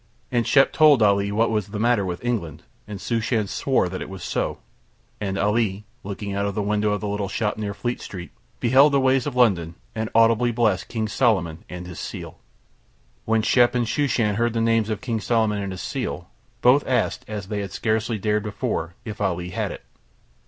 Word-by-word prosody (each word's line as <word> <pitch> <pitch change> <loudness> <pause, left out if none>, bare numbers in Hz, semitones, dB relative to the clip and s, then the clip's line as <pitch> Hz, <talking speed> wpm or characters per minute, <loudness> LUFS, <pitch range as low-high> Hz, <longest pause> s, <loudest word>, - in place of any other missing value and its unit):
And 120 -2 +1
Shep 135 -1 +4
told 150 -7 +6
Ali 100 0 +3
what 115 +3 +2
was 105 -3 0
the 105 +1 -5
matter 115 -2 +3
with 90 +4 -5
England 85 -10 -2 0.2
and 105 -2 -6
Shooshan 115 -1 0
swore 130 -1 +1
that 95 +1 -5
it - - -6
was 95 -2 -8
so, - - -2 0.6
and 100 -2 -2
Ali 105 0 0 0.2
looking 100 0 -5
out 100 +1 0
of 100 - -4
the 105 - 0
window 105 +1 +1
of 105 - -2
the 105 - -3
little 100 -1 -2
shop 105 -2 -1
near 105 -2 -4
Fleet 120 +2 -3
Street 90 -3 -8 0.3
beheld 135 +4 +5
the 140 - +4
ways 130 0 +2
of 140 - -4
London 90 -9 +2 0.2
and 110 0 -3
audibly 115 +1 +4
blessed 110 -5 +1
King 110 -2 -2
Solomon 95 -9 +1
and 90 0 -7
his 90 -2 -8
seal. - - -7 0.9
When 110 0 +2
Shep 120 +3 +4
and 120 -1 +2
Shooshan 115 -6 +1
heard 120 0 +1
the 115 - 0
names 115 -1 +2
of 110 -2 -3
King 120 -3 -2
Solomon 110 -2 +1
and 100 -1 -4
his 95 - -6
seal - - -4 0.3
both 130 +4 +6
asked, 125 -4 0
as 105 -3 -6
they 105 -1 -2
had 100 -3 -4
scarcely 110 +3 -1
dared 105 +1 0
before, 90 -5 -3
if 105 -2 -6
Ali 90 -3 -1
had - - -2
it. - - -10
105 Hz, 200 wpm, -23 LUFS, 100-120 Hz, 0.9 s, told